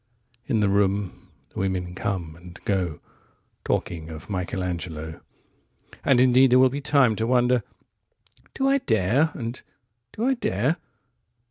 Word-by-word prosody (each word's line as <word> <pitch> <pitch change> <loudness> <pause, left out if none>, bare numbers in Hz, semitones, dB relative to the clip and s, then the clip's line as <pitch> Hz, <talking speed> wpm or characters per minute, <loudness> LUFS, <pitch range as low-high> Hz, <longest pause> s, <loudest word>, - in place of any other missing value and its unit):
35In 115 -5 +2
the 100 - +3
room 100 -1 0 0.2
the - - -7
women 90 -2 -2
come 90 -4 -3
and 90 0 -13
go36Talking 85 -2 -4
of 80 +5 -9
Michelangelo.37And 90 - -4
indeed 130 +1 +6
there 125 - +7
will 130 0 +6
be 140 +3 -4
time38To 125 -6 +3
wonder, 125 -1 +3 0.9
"Do 270 - +1
I 275 +1 +3
dare?" 115 - +2
and, 120 -1 -5 0.5
"Do 225 - -3
I 265 - +3
dare?" 140 - 0
105 Hz, 120 wpm, -25 LUFS, 90-130 Hz, 0.9 s, there